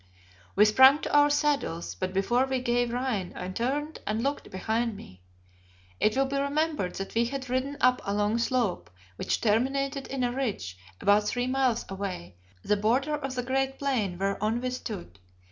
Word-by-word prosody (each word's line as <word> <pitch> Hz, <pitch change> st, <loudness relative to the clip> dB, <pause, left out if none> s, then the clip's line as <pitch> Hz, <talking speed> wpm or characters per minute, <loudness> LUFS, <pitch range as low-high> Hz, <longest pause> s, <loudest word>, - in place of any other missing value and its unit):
We 210 Hz, -, +6 dB
sprang 260 Hz, +6 st, +7 dB
to -, -, -3 dB
our 290 Hz, 0 st, +6 dB
saddles, 290 Hz, -, 0 dB
but 185 Hz, -1 st, -3 dB
before 235 Hz, +7 st, +2 dB
we 265 Hz, -1 st, 0 dB
gave 245 Hz, -1 st, 0 dB
rein 240 Hz, -7 st, -2 dB
I 180 Hz, -, -5 dB
turned 280 Hz, +10 st, -2 dB
and 215 Hz, +2 st, -1 dB
looked 280 Hz, +1 st, -2 dB
behind 220 Hz, +3 st, -1 dB
me. 90 Hz, -, -13 dB, 0.8 s
It 215 Hz, +4 st, +2 dB
will 270 Hz, -, +3 dB
be 275 Hz, +1 st, -2 dB
remembered 285 Hz, -, -1 dB
that 195 Hz, -, -5 dB
we 230 Hz, +1 st, +2 dB
had 260 Hz, 0 st, -5 dB
ridden 265 Hz, +3 st, -1 dB
up 250 Hz, 0 st, +4 dB
a 200 Hz, -, -2 dB
long 210 Hz, +2 st, +1 dB
slope 235 Hz, -, 0 dB, 0.3 s
which -, -, -1 dB
terminated 270 Hz, +5 st, 0 dB
in 270 Hz, -2 st, -2 dB
a 245 Hz, -, +1 dB
ridge, 225 Hz, -, -3 dB, 0.2 s
about 205 Hz, +1 st, +4 dB
three 245 Hz, +2 st, 0 dB
miles 255 Hz, -2 st, +1 dB
away, 190 Hz, -, -5 dB, 0.3 s
the 210 Hz, -, +2 dB
border 250 Hz, +8 st, +1 dB
of 270 Hz, -3 st, -3 dB
the 250 Hz, -, -2 dB
great 270 Hz, +1 st, -1 dB
plain 230 Hz, -11 st, -1 dB
whereon 200 Hz, +4 st, 0 dB
we 255 Hz, 0 st, -2 dB
stood. 195 Hz, -, -7 dB
245 Hz, 180 wpm, -28 LUFS, 205-270 Hz, 0.8 s, sprang